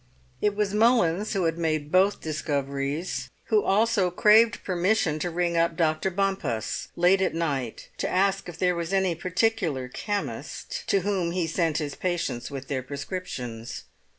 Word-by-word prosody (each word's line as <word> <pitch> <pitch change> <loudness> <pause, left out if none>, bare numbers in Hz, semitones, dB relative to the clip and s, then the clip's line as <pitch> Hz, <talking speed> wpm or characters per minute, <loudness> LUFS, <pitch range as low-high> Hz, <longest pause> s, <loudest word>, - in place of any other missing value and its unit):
It 210 -1 +2
was 205 -1 0
Mullins, 210 -4 +3
who 195 -3 0
had 165 0 0
made 155 -2 -1
both 190 +3 +3
discoveries, 145 +1 -2 0.2
who 425 -1 +4
also 205 -2 +3
craved 215 +5 +5
permission 180 -3 +1
to 175 - -1
ring 170 0 0
up 165 0 +2
Dr. 160 +2 +1
Bompas, 185 - -1
late 180 +3 +4
at 190 - +1
night, 140 -8 -2
to - - -1
ask 195 0 +1
if 165 - -9
there 180 0 +2
was 170 +1 -3
any 190 -2 +2
particular 180 - 0
chemist 210 - -4
to 195 - +3
whom 180 -3 -1
he 180 -2 0
sent 165 -1 0
his 145 -3 -2
patients 170 -9 -2
with 135 -1 -7
their 135 -3 -2
prescriptions. 130 -5 -6
175 Hz, 155 wpm, -26 LUFS, 155-195 Hz, 0.2 s, craved